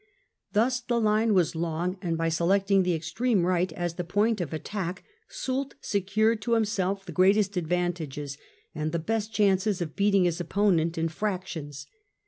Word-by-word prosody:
Thus 245 +4 +2
the 240 -1 -1
line 215 0 +2
was 175 -3 +2
long, 170 +3 -2
and 165 -2 -1
by 165 0 0
selecting 195 +4 +2
the 180 -2 +1
extreme 200 +4 0
right 180 0 +1
as 175 -1 -3
the 180 - -4
point 205 +4 +1
of 165 - -4
attack 180 +2 -4 0.3
Soult 265 +1 -3
secured 215 +3 +1
to 235 +3 0
himself 200 -3 0
the - - -7
greatest 195 +2 +3
advantages 165 -5 -2 0.4
and 155 +1 -3
the - - +1
best 215 +5 -2
chances 200 -1 +2
of 160 -4 -4
beating 200 -1 +3
his 175 0 0
opponent 170 -2 +1
in 165 0 +1
fractions. 160 -6 -4
185 Hz, 160 wpm, -27 LUFS, 170-210 Hz, 0.4 s, greatest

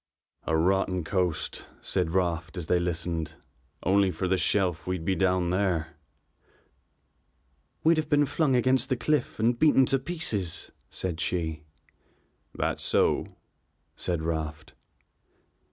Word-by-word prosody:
"A 80 - +2
rotten 90 +1 +1
coast," 90 0 -1
said - - -1
Raft 85 -2 -1
as 85 - -3
they 90 +3 +2
listened. 85 -2 -2 0.5
"Only 95 +1 +4
for 90 +1 -2
this 95 0 +1
shelf 90 -5 0
we'd 90 -3 -2
be 95 - +2
down 90 -1 +1
there." 90 -5 0 1.9
"We'd 165 +1 +5
have 155 -1 -1
been 145 -1 +4
flung 145 -1 +1
against 130 +2 +2
the 130 - +1
cliff 150 -5 0
and 120 +2 +2
beaten 145 -4 +5
to 135 +1 +1
pieces," 130 - -3 0.2
said 90 -3 -4
she. 80 -5 -2 0.9
"That's - - -1
so," - - +1 0.6
said 85 -3 -2
Raft. 80 -1 -3
90 Hz, 125 wpm, -27 LUFS, 85-120 Hz, 1.9 s, We'd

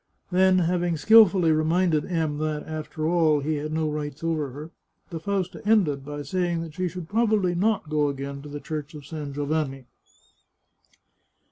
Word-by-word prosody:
Then, 185 +1 +4
having 175 -1 +1
skilfully 195 -3 +6
reminded 155 0 +2
M 160 -4 -1
that, 155 -1 -2
after 155 0 -4
all, 160 -3 +3
he 155 +2 -1
had 150 +1 -4
no 160 0 0
rights 150 0 -4
over 160 -4 -1
her, 150 +5 -9 0.4
the 165 - -4
Fausta 190 +1 -3
ended 185 -11 +2
by 145 +1 -6
saying 175 +2 -1
that 160 -2 -9
she 185 +2 -2
should 175 -1 -7
probably 215 -3 +2
not 200 0 0
go 150 -1 +1
again 140 0 -5
to 145 - -10
the 145 0 -6
Church 155 0 -6
of 145 -2 -10
San 150 -1 -6
Giovanni. 145 -2 -2
155 Hz, 165 wpm, -25 LUFS, 150-180 Hz, 0.4 s, skilfully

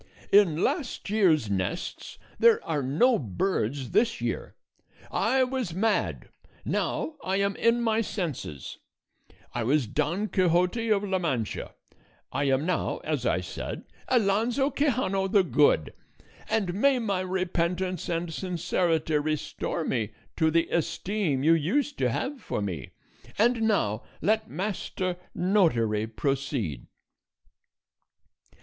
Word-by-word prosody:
"In 180 -6 +5
last 265 - -2
year's 175 - +3
nests 100 - -3 0.2
there 465 -1 +6
are 155 -3 -1
no 165 - +3
birds 130 - -2
this 235 0 +2
year. - - -3 0.6
I 265 0 +2
was 250 -9 -2
mad 215 +2 0 0.4
now 310 - -1
I 190 - 0
am 200 0 +1
in 235 +1 +2
my 225 -1 +2
senses; 155 - -5 0.7
I 120 - -1
was 135 +3 +2
Don 155 - -1
Quixote 180 +4 +2
of 205 -2 +3
La 190 -2 0
Mancha 130 - -2 0.6
I 145 - 0
am 135 +2 +2
now, 180 - 0
as - - -1
I - - +1
said, - - -6 0.2
Alonso 240 +4 +2
Quixano 245 -9 +1
the 195 0 +4
Good; 145 - +3 0.6
and 195 -5 0
may 265 +7 +3
my 200 -6 -1
repentance 185 0 -1
and 170 -1 -2
sincerity 165 -3 0
restore 155 +2 -2
me 110 -3 -1 0.2
to 160 -1 +3
the 165 +1 +2
esteem 170 -3 -1
you 160 +2 +6
used 245 - 0
to - - +2
have 270 0 -3
for - - -3
me; 90 -10 -4 0.4
and 235 +2 +3
now 190 - +1 0.2
let 220 +1 +1
Master 185 -2 -3 0.2
Notary 120 - +2
proceed. 130 - -2
180 Hz, 125 wpm, -27 LUFS, 145-215 Hz, 0.7 s, there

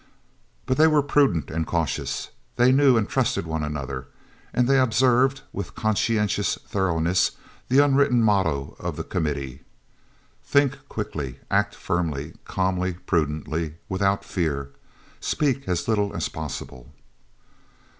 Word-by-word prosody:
But 130 0 0
they 155 +1 +7
were 150 -2 +4
prudent 140 - +2
and 80 +1 -2
cautious, 85 -3 -2 0.2
they 125 +1 +5
knew 135 -2 +5
and 110 - +1
trusted - - 0
one 80 -1 -2
another, 70 -3 -4 0.4
and 125 -1 +2
they 135 0 +4
observed, 130 +2 +3
with 100 -2 -5
conscientious 110 -1 +1
thoroughness, 90 -2 +1 0.3
the 140 +3 +5
unwritten 135 -4 +3
motto 90 -10 +1
of - - -4
the - - -4
Committee: 70 -6 -3 0.8
"Think 140 -1 +2
quickly, 70 - -4
act - - +2
firmly, 80 -3 -2
calmly, 95 -1 0
prudently, 80 -1 -1
without 100 +1 +1
fear. 70 -6 -2 0.5
Speak 135 -3 0
as 90 -2 -1
little 105 -3 +1
as - - -1
possible." 70 -4 -7
95 Hz, 125 wpm, -24 LUFS, 80-125 Hz, 0.8 s, they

